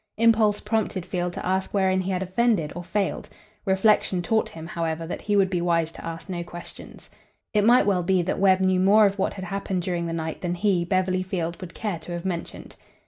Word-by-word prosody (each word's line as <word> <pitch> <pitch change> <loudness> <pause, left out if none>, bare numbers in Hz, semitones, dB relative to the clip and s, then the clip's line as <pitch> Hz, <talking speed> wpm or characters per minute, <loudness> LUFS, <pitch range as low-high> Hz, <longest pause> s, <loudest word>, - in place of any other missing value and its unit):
Impulse 220 -2 +4
prompted 215 -5 -1
Field 180 -1 -2
to - - -6
ask 190 +2 -1
wherein 190 -1 +2
he 185 - -4
had 185 0 -1
offended 190 -4 +1
or 175 - -5
failed. 195 +3 -2 0.4
Reflection 190 -2 +2
taught 220 +4 +1
him, 160 -1 -9
however, 165 -1 -3
that 170 - -5
he 205 - 0
would 195 -2 +3
be 175 -2 0
wise 170 -2 +1
to - - -11
ask 165 +2 -6
no 175 -2 -4
questions. 175 0 -11 0.5
It 210 -1 +3
might 240 +1 +5
well 195 -3 +2
be 180 0 +2
that 185 - -2
Webb 190 -1 +4
knew 185 -1 +3
more 205 +3 +6
of 200 0 0
what - - 0
had 190 -1 -6
happened 190 -1 -3
during 175 -2 -2
the - - -3
night 160 -1 -4
than 175 -1 -2
he, 185 -1 +1
Beverly 185 0 +1
Field, 175 -3 -3
would 180 -2 -9
care 205 -7 -3
to 170 +2 -8
have 175 +1 -5
mentioned. 175 -3 -5
185 Hz, 220 wpm, -25 LUFS, 175-200 Hz, 0.5 s, more